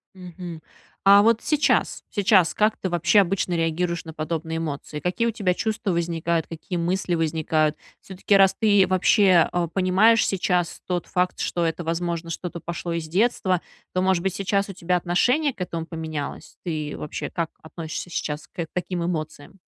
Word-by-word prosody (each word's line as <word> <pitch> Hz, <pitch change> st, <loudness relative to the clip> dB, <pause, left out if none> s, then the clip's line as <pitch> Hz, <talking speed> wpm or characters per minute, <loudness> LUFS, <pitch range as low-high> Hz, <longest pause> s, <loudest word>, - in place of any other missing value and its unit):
Мгм. 175 Hz, -2 st, -9 dB, 0.4 s
А, 200 Hz, +1 st, +8 dB
вот 230 Hz, +1 st, +3 dB
сейчас, 300 Hz, -1 st, +1 dB
сейчас 195 Hz, -4 st, +3 dB
как 215 Hz, +1 st, +2 dB
ты 190 Hz, -, -3 dB
вообще 175 Hz, +4 st, +4 dB
обычно 185 Hz, -1 st, -1 dB
реагируешь 170 Hz, +1 st, -1 dB
на 160 Hz, -, -9 dB
подобные 160 Hz, +1 st, -3 dB
эмоции? 150 Hz, -1 st, -4 dB
Какие 185 Hz, +8 st, 0 dB
у -, -, +1 dB
тебя 195 Hz, -4 st, 0 dB
чувства 220 Hz, 0 st, -2 dB
возникают, 170 Hz, -1 st, -1 dB
какие 170 Hz, +2 st, -5 dB
мысли 175 Hz, +1 st, 0 dB
возникают? 155 Hz, -1 st, 0 dB, 0.2 s
Всё-таки, 195 Hz, +1 st, 0 dB
раз 195 Hz, -1 st, +5 dB
ты 205 Hz, -3 st, +5 dB
вообще, 185 Hz, -1 st, +4 dB
а, 175 Hz, -1 st, 0 dB
понимаешь 195 Hz, +6 st, +4 dB
сейчас 180 Hz, -2 st, 0 dB
тот 180 Hz, -2 st, -2 dB
факт, 180 Hz, 0 st, 0 dB
что 170 Hz, -1 st, -1 dB
это, 165 Hz, +1 st, -2 dB
возможно, 170 Hz, 0 st, -2 dB
что-то 170 Hz, +1 st, -5 dB
пошло 170 Hz, +1 st, -5 dB
из 165 Hz, -1 st, -3 dB
детства, 185 Hz, -1 st, +1 dB, 0.3 s
то, 185 Hz, -, +1 dB
может 185 Hz, -2 st, +2 dB
быть, 190 Hz, -1 st, -1 dB
сейчас 195 Hz, +1 st, 0 dB
у 195 Hz, -, -7 dB
тебя 180 Hz, 0 st, 0 dB
отношение 250 Hz, -, +1 dB
к -, -, -11 dB
этому 165 Hz, -2 st, -3 dB
поменялось? 160 Hz, -3 st, -6 dB
Ты 155 Hz, -3 st, -3 dB
вообще, 150 Hz, -, -5 dB
как 165 Hz, -1 st, -3 dB
относишься 160 Hz, +2 st, -6 dB
сейчас 150 Hz, -2 st, -4 dB
к 170 Hz, -, -5 dB
таким 180 Hz, -1 st, -2 dB
эмоциям? 155 Hz, +1 st, -5 dB
175 Hz, 165 wpm, -24 LUFS, 165-195 Hz, 0.4 s, А